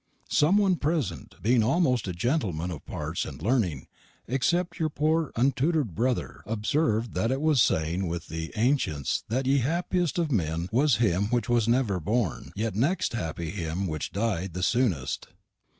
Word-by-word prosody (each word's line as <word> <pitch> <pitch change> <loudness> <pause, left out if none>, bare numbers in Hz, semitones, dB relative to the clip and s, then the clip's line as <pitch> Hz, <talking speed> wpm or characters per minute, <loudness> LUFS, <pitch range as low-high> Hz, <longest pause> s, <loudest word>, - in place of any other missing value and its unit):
Some 160 +7 +4
one 195 -4 +3
present, 155 -3 -2
being 120 +2 +4
almost 125 - +2
all 90 - -2
gentelmenn 90 - -1
of 80 - -7
parts - - -3
and - - -7
learning, 95 - 0 0.4
except 170 +8 0
y'r 160 -1 +1
pore 155 +1 +1
untuter'd 135 - +1
brother, 125 +6 -1
observed 115 +1 0
that 95 +5 0
it 135 +1 0
was 155 -2 +3
a - - +7
saying 85 +4 0
with 85 0 -4
the 80 0 -5
ainchents 110 - +1
that 130 +4 0
ye 135 +1 +3
happiest 175 +5 0
of 165 -3 0
men 85 - -1
was 135 +3 +4
him 100 -3 +1
wich 120 -1 0
was 120 -2 +2
never 120 -6 +2
born; 105 +2 -1
ye 110 +3 -1
next 140 - +1
happy 85 -6 -3
him 90 -1 -3
wich 80 -4 -3
died 95 -5 -2
the 90 - -2
soonest. 100 - 0
115 Hz, 165 wpm, -27 LUFS, 90-140 Hz, 0.4 s, a